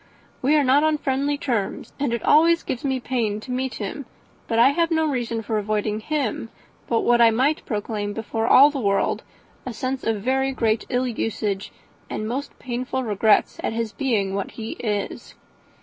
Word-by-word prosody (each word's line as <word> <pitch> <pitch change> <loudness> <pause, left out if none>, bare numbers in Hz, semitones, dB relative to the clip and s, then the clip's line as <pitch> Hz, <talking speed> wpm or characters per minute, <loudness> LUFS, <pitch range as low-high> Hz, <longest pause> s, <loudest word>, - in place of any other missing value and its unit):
We 285 +4 +3
are 295 - +4
not 270 +2 +4
on 310 -1 +2
friendly 280 +1 0
terms, 235 -9 -3
and 280 -3 0
it 235 -1 -2
always 335 +2 +5
gives 245 - -4
me 265 -2 0
pain 230 -5 -1
to 255 - -8
meet 255 -1 -2
him, 230 +6 -5 0.4
but 225 - -1
I 240 +3 +7
have 335 +3 +1
no 320 -1 +2
reason 240 -6 -2
for 215 0 -1
avoiding 210 0 -1
him 245 -3 -2 0.4
but 230 - +1
what 240 0 +3
I 230 - +8
might 265 +7 +1
proclaim 205 -2 -3
to 225 - -5
all 240 +6 +6
the 285 - -4
world 200 -4 +1 0.4
a 250 - -5
sense 255 +3 -3
of 220 -3 -1
very 265 +2 +1
great 225 -3 0
ill 250 +1 +1
usage, 210 -4 -2 0.4
and 215 - -3
most 270 +5 -4
painful 255 +1 -3
regrets 215 -1 +2
at - - -1
his 225 -1 -2
being 215 -8 0
what 200 -1 -2
he 225 -1 -5
is. 210 -3 -3
240 Hz, 185 wpm, -23 LUFS, 215-270 Hz, 0.4 s, I